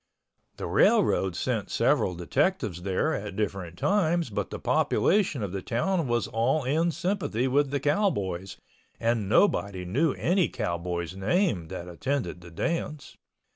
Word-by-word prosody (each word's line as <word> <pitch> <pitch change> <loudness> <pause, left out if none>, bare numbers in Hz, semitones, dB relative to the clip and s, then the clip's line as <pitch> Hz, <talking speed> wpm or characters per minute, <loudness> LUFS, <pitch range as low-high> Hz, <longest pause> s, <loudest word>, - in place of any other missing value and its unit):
The - - -4
railroad 95 -3 +3
sent - - -2
several 90 - +2
detectives 105 - 0
there 100 - 0
at 100 -6 -4
different 95 -5 -3
times 175 - +1
but - - -2
the - - -5
population 180 - +1
of 100 - -3
the 95 0 -4
town 160 - 0
was 120 -1 +1
all 130 +7 +1
in 155 +7 +1
sympathy 160 - -1
with 140 +2 +2
the 140 +1 -1
cowboys 100 - 0 0.4
and 115 -3 0
nobody 100 - +2
knew 135 - +1
any 180 +1 +1
cowboy's 85 -4 -3
name 100 - +1
that 85 +2 -7
attended 120 +2 -3
the 85 - -11
dance. 150 - -3
120 Hz, 140 wpm, -27 LUFS, 95-160 Hz, 0.4 s, railroad